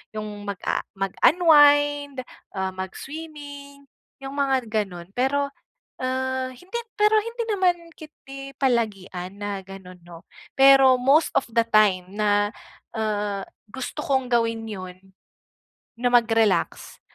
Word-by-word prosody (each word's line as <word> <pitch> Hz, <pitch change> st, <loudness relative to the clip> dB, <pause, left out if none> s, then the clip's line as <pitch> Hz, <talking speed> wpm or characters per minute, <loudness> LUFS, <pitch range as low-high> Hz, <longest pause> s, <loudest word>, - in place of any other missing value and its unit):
'yong 215 Hz, 0 st, -4 dB, 0.2 s
mag-a 200 Hz, -2 st, -2 dB
mag-unwind, 290 Hz, -, +4 dB, 0.3 s
ah, 190 Hz, 0 st, -2 dB
mag-swimming, 280 Hz, +7 st, -9 dB, 0.4 s
'yong 270 Hz, +1 st, -6 dB
mga 270 Hz, -4 st, 0 dB
ganun. 195 Hz, -6 st, -3 dB
Pero, 280 Hz, +2 st, +1 dB, 0.5 s
ah, 260 Hz, 0 st, -1 dB
hindi 370 Hz, -, -7 dB, 0.2 s
pero 425 Hz, +1 st, +5 dB
hindi 465 Hz, +2 st, -5 dB
naman 355 Hz, -4 st, 0 dB
ketdi 275 Hz, -3 st, -11 dB
palagian 200 Hz, -7 st, -1 dB
na 205 Hz, -1 st, -4 dB
ganun 185 Hz, -2 st, -11 dB
'no. 170 Hz, -1 st, -12 dB, 0.4 s
Pero 270 Hz, -1 st, +7 dB
most 285 Hz, +5 st, +4 dB
of -, -, -3 dB
the 230 Hz, 0 st, +2 dB
time 205 Hz, -5 st, +3 dB
na, 205 Hz, -1 st, +2 dB, 0.5 s
ah, 210 Hz, -2 st, -2 dB, 0.3 s
gusto 260 Hz, +3 st, -6 dB
kong 265 Hz, -2 st, 0 dB
gawin 230 Hz, -1 st, +1 dB
'yon 185 Hz, -2 st, -8 dB, 1.0 s
na 245 Hz, +1 st, +1 dB
mag-relax 225 Hz, -3 st, +1 dB
255 Hz, 110 wpm, -24 LUFS, 205-285 Hz, 1.0 s, Pero